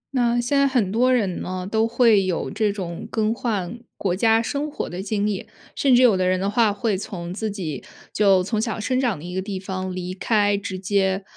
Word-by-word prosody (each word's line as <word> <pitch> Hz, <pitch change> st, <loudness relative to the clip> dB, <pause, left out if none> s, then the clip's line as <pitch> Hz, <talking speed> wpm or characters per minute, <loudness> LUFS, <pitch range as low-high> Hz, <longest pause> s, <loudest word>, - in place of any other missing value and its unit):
那 240 Hz, -1 st, +2 dB
现 245 Hz, +4 st, +1 dB
在 280 Hz, -, +4 dB
很 245 Hz, -8 st, +1 dB
多 245 Hz, +4 st, +3 dB
人 205 Hz, -8 st, 0 dB
呢， 185 Hz, 0 st, -4 dB
都 220 Hz, +1 st, +2 dB
会 230 Hz, -4 st, +4 dB
有 185 Hz, -3 st, -2 dB
这 215 Hz, -2 st, +1 dB
种 180 Hz, -4 st, -6 dB
更 220 Hz, 0 st, 0 dB
换 230 Hz, -3 st, -3 dB, 0.2 s
国 185 Hz, -3 st, -1 dB
家 225 Hz, +3 st, +3 dB
生 290 Hz, +5 st, -2 dB
活 295 Hz, -, -4 dB
的 180 Hz, +2 st, -5 dB
经 205 Hz, +1 st, -1 dB
历， 205 Hz, -3 st, -2 dB, 0.3 s
甚 270 Hz, -3 st, +4 dB
至 250 Hz, -, +5 dB
有 235 Hz, -5 st, +6 dB
的 185 Hz, -1 st, +1 dB
人 185 Hz, 0 st, +2 dB
的 195 Hz, -, -1 dB
话 220 Hz, -1 st, +3 dB
会 210 Hz, 0 st, -1 dB
从 180 Hz, -2 st, -6 dB
自 220 Hz, +2 st, -3 dB
己 170 Hz, -, -5 dB, 0.3 s
就 195 Hz, -3 st, +4 dB
从 215 Hz, +3 st, -1 dB
小 225 Hz, -1 st, -2 dB
生 255 Hz, +4 st, 0 dB
长 245 Hz, -8 st, 0 dB
的 150 Hz, -, -10 dB
一 180 Hz, -, -6 dB
个 190 Hz, -, -1 dB
地 195 Hz, -1 st, -5 dB
方 185 Hz, -1 st, -4 dB
离 180 Hz, 0 st, -4 dB
开， 205 Hz, +1 st, +2 dB
直 200 Hz, -2 st, -4 dB
接， 190 Hz, 0 st, 0 dB
205 Hz, 245 characters per minute, -23 LUFS, 185-230 Hz, 0.3 s, 有